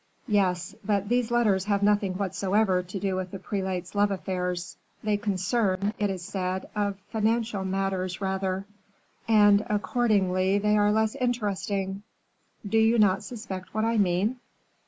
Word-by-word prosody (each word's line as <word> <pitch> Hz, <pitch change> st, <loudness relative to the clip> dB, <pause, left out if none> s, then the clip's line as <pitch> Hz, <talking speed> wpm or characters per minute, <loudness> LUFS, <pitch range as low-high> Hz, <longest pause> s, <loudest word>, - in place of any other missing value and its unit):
"Yes, 185 Hz, -5 st, +1 dB
but 200 Hz, -1 st, 0 dB
these 245 Hz, -1 st, +1 dB
letters 215 Hz, -6 st, +2 dB
have 200 Hz, -1 st, +1 dB
nothing 205 Hz, -2 st, +2 dB
whatever 195 Hz, 0 st, +1 dB
to 185 Hz, +2 st, -6 dB
do 195 Hz, -1 st, -1 dB
with 185 Hz, 0 st, -3 dB
the 195 Hz, -, -6 dB
prelate's 190 Hz, -2 st, -3 dB
love 205 Hz, 0 st, +3 dB
affairs. 180 Hz, -2 st, -3 dB, 0.3 s
They 210 Hz, -1 st, +1 dB
concern, 200 Hz, 0 st, 0 dB
it 205 Hz, -1 st, +1 dB
is 185 Hz, -2 st, -4 dB
said, 185 Hz, -1 st, -3 dB, 0.4 s
financial 220 Hz, -2 st, 0 dB
matters 190 Hz, -1 st, -2 dB
rather." 190 Hz, -1 st, -2 dB, 0.6 s
"And 205 Hz, -2 st, +5 dB
accordingly 200 Hz, -3 st, +1 dB
they 210 Hz, +1 st, +2 dB
are 205 Hz, 0 st, +4 dB
less 220 Hz, 0 st, +2 dB
interesting." 200 Hz, -6 st, -2 dB, 0.7 s
"Do 225 Hz, +2 st, +2 dB
you 225 Hz, +1 st, +4 dB
not 195 Hz, -3 st, +4 dB
suspect 200 Hz, -6 st, -7 dB
what 215 Hz, 0 st, +1 dB
I 230 Hz, -1 st, +1 dB
mean?" 200 Hz, +6 st, +1 dB
200 Hz, 140 wpm, -27 LUFS, 185-215 Hz, 0.7 s, And